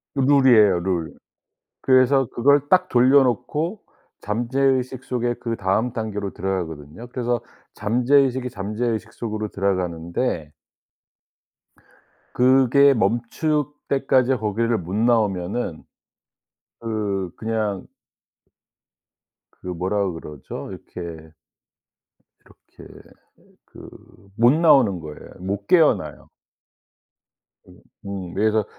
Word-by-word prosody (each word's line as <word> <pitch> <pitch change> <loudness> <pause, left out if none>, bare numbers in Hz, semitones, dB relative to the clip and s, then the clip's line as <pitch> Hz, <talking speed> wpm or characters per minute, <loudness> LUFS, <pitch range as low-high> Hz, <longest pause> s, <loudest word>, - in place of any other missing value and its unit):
룰이에요 130 -8 +5
룰. 85 -3 -2 0.7
그래서 130 0 +4
그걸 140 +4 +4
딱 185 0 +3
돌려놓고 135 - +2 0.4
잠재의식 130 +3 -1
속에 120 -2 -1
그다음 115 +1 -1
단계로 105 -4 -4
들어가거든요. 85 +1 -5
그래서 120 -1 -2 0.3
잠재의식의 125 +2 +2
잠재의식 110 +2 -3
속으로 110 -2 -4
들어가는데 85 -3 -2 1.8
그게 135 +2 +5
멈출 120 - 0 0.2
때까지 135 -1 +2
거기를 115 +2 0
못 90 +1 -6
나오면은 105 -5 0 1.0
그 105 -5 -3
그냥 110 -3 -3 1.7
그 - - -14
뭐라 95 +3 -1
그러죠 75 -4 -8
이렇게, - - -10 1.4
이렇게 - - -17 0.6
그 - - -13 0.5
못 120 +2 +5
나오는 140 - +4
거예요. 75 -1 -10
못 100 +2 -4
깨어나요. 110 - +2 1.4
으. - - -16 0.3
음. 95 -3 -6
그래서 110 0 +1
115 Hz, 210 characters per minute, -22 LUFS, 95-130 Hz, 1.8 s, 룰이에요